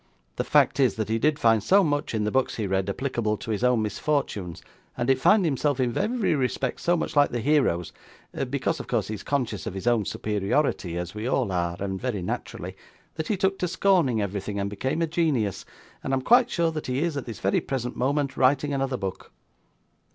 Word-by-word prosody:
The - - 0
fact - - +3
is, 130 -3 +3
that 110 -1 -3
he 110 +1 +1
did 150 +3 +2
find 115 -5 +3
so 195 - +4
much 145 -6 -1
in 105 - 0
the 105 - 0
books 130 0 +1
he 110 - -2
read, 95 0 0
applicable 120 -2 -1
to 110 - -6
his 105 +2 -2
own 125 -3 +3
misfortunes, 105 - -2 0.3
and 120 - -1
did 135 -1 +2
find 210 +2 +5
himself 145 -2 0
in 125 -2 0
every 215 -2 +1
respect 130 -2 -1
so 175 0 +2
much - - -3
like 145 -1 +5
the 120 - -3
heroes 125 - +1 0.6
because 140 +4 -1
of - - -7
course 110 -5 -1
he - - -2
is 105 - -6
conscious 125 -8 -2
of - - -5
his 95 - -6
own 120 -4 +2
superiority, 105 - -1
as 90 0 -4
we 105 +3 -4
all 130 -5 0
are, 85 -1 -1
and 95 -1 -3
very 115 -8 -2
naturally - - -5 0.4
that 160 -1 -4
he 210 - 0
took 195 0 0
to 180 - 0
scorning 170 - +2
everything, 100 +1 -4
and 100 0 -2
became 130 +10 -1
a - - +3
genius; 150 - 0 0.4
and 135 - -2
I - - +1
am 130 - -4
quite 245 - +5
sure 170 -7 +1
that 155 -1 -5
he 130 +4 0
is, 170 -3 -1
at 140 - -4
this 115 -3 -7
very 95 - +1
present 125 -2 -3
moment, 140 +1 0
writing 140 +2 +2
another 135 -1 -1
book. 95 -4 -6
125 Hz, 220 wpm, -26 LUFS, 105-150 Hz, 0.6 s, find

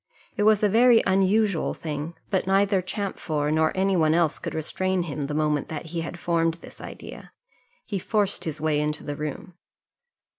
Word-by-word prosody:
It 210 - -2
was 215 -1 +3
a - - +6
very 230 +3 +5
unusual 195 -1 +2
thing, 155 +1 -5 0.2
but 190 -1 0
neither 195 0 +3
Champfort 175 -6 -2
nor 160 0 +3
any 195 0 +2
one 160 -2 +3
else 165 -3 +2
could - - -5
restrain 185 +3 -1
him, 145 -3 -4
the 150 - -3
moment 150 -2 +1
that 160 +1 -5
he 170 - -1
had 165 +1 -6
formed 165 -1 +1
this 170 - -13
idea; - - -10 0.5
he 200 -3 -3
forced 205 +1 0
his 155 -2 -3
way 150 -1 +1
into 150 0 -2
the 145 - -4
room. 150 +4 -6
170 Hz, 180 wpm, -25 LUFS, 155-195 Hz, 0.5 s, a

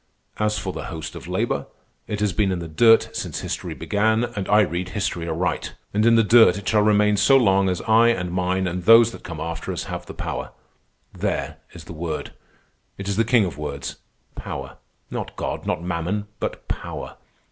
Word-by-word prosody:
As 105 0 +1
for 95 - -4
the - - -6
host 80 -1 -6
of - - -9
labor, - - -1 0.4
it 105 -1 -3
has 105 -3 +1
been 100 -2 +1
in 90 - -1
the 85 -1 -5
dirt 115 +8 +4
since - - -4
history - - -4
began, 110 +2 +1
and 110 -6 -4
I 105 +1 +6
read 90 -2 -1
history 90 -4 -2
aright. 85 +1 -2 0.2
And 105 +3 +3
in 115 - +6
the 115 - +5
dirt 110 -3 +6
it 100 - -8
shall 110 -1 +3
remain 105 0 +3
so 135 +7 +6
long 95 -6 +3
as 90 -2 -2
I 115 +1 +4
and 90 -7 0
mine 95 +1 0
and 90 0 -3
those 115 +1 +7
that - - -11
come 80 -2 -7
after 80 +1 -4
us - - -3
have - - -6
the - - -9
power. - - -5 0.6
There 70 +2 -2 0.2
is 85 - -10
the 85 - -9
word. 80 -1 -4 0.6
It 100 - -6
is 100 - 0
the 115 - +3
king 115 -2 +3
of 80 -6 -6
words—Power. 70 -1 -7 0.3
Not - - -5
God, - - -4
not 85 - -1
Mammon, 90 +4 -2
but - - -5
Power. - - -6
95 Hz, 200 wpm, -23 LUFS, 85-110 Hz, 0.6 s, those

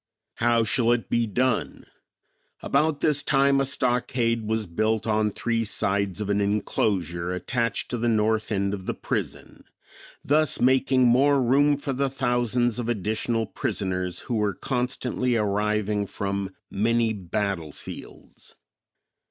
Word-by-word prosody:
How 120 0 +3
shall 115 +1 +2
it 120 -2 -3
be 115 -1 +2
done? 125 +2 -1 0.8
About 155 -1 +1
this 150 -2 +3
time 140 -1 +3
a - - +1
stockade 125 -4 0
was 110 0 -1
built 110 +5 -1
on 110 -1 +1
three 115 +2 -1
sides 100 -2 0
of 105 - -3
an 100 0 +1
enclosure 95 -4 -1
attached 115 +5 -2
to 120 - -2
the 120 +1 +1
north 110 0 +1
end 100 -1 0
of 95 -2 -6
the - - -2
prison, - - -5 0.6
thus 155 +1 +2
making 130 +1 +3
more 135 +4 +4
room 140 +3 +3
for 140 -1 -3
the 135 +1 0
thousands 120 -2 0
of 120 -1 -3
additional 110 +1 -1
prisoners 90 -5 -3
who - - -5
were 105 -2 0
constantly 125 -1 -1
arriving 105 -1 0
from 100 -1 -4 0.2
many 115 +2 +1
battle 95 -4 -3
fields. - - -11
115 Hz, 135 wpm, -25 LUFS, 105-125 Hz, 0.8 s, more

